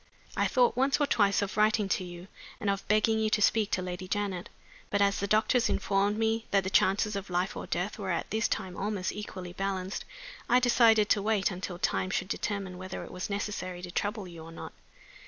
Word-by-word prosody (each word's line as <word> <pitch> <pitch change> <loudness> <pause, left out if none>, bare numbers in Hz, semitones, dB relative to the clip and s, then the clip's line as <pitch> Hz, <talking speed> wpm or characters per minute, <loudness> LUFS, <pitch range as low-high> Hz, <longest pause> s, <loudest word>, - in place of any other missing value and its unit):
I - - +2
thought 245 -2 +3
once 270 +3 +2
or 290 - +3
twice 205 -6 +3
of 200 - -4
writing 215 -1 +3
to 185 - 0
you, 175 0 -9 0.3
and 200 - +1
of 195 - -4
begging 215 +1 +3
you 220 0 +1
to 215 - +2
speak 210 0 +3
to 185 - +1
Lady 180 0 -5
Janet. 195 -2 -2 0.4
But 205 - +1
as 200 0 +3
the 200 - -1
doctors 220 +4 +3
informed 200 +1 +1
me 225 0 0
that 195 -1 +3
the 190 - -3
chances 205 +3 +3
of 200 -1 -5
life 180 +3 -1
or - - -6
death 190 +5 -2
were 195 -2 -4
at 170 - -2
this 220 +1 +1
time 185 -1 -3
almost 200 -1 -2
equally 185 -4 -7
balanced, 190 0 -3 0.5
I 250 - +6
decided 230 -4 +5
to 205 - +3
wait 210 -1 +1
until 180 0 -5
time 185 0 0
should 185 0 -2
determine 195 -4 -3
whether 185 0 -6
it - - -10
was 180 +2 -5
necessary 200 -3 -4
to 180 - -6
trouble 205 +1 -2
you 170 -2 -10
or 165 - -10
not. 165 - -8
200 Hz, 215 wpm, -29 LUFS, 185-215 Hz, 0.5 s, I